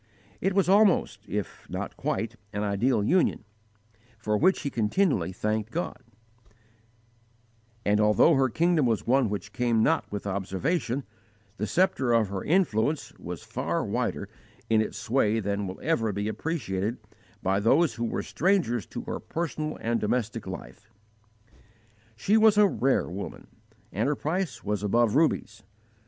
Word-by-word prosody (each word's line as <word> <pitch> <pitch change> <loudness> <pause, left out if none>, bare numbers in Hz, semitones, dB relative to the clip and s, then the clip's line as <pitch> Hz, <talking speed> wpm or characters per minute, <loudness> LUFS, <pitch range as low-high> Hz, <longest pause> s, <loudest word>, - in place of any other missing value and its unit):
It 190 +1 0
was 195 -2 +3
almost, 200 -1 +4
if - - -5
not - - -5
quite, 115 +1 -2 0.2
an 105 +1 -2
ideal 105 +3 +1
union, 175 - +2 0.7
for 105 -1 -1
which 185 - +3
he 140 - -2
continually 110 - +1
thanked 105 +3 -2
God; 160 -4 -4 1.8
and, 105 +1 +3
although 105 +10 +5
her 135 -2 +3
kingdom 165 0 +2
was 115 -2 0
one 130 -1 +3
which 100 0 -5
came 120 -3 +2
not 160 0 +1
with 105 0 -5
observation,' 115 - -1 0.5
the 105 - -2
sceptre 170 -10 +2
of 115 -4 +3
her 95 -1 -4
influence 155 - +1
was 85 -1 -7
far - - -2
wider - - -2 0.4
in 110 -1 +5
its 110 - -4
sway 115 -3 +1
than 100 -1 -2
will 95 - -7
ever 115 -10 +1
be 100 +1 -3
appreciated 110 - -2 0.5
by 95 +1 +2
those 135 +9 +3
who 115 +1 -3
were - - -2
strangers 165 - +1
to - - -6
her - - -4
personal 155 -2 -4
and 115 0 0
domestic 110 -1 -1
life. 100 +3 -9 1.3
She 200 - +2
was 220 -1 +5
a 210 - +7
rare 135 -7 +1
woman 95 +3 -7 0.5
and 110 +7 0
her 150 - +1
price 155 -7 -3
was 105 -1 -1
above 110 +2 +2
rubies. 155 -6 +1
115 Hz, 145 wpm, -27 LUFS, 105-155 Hz, 1.8 s, a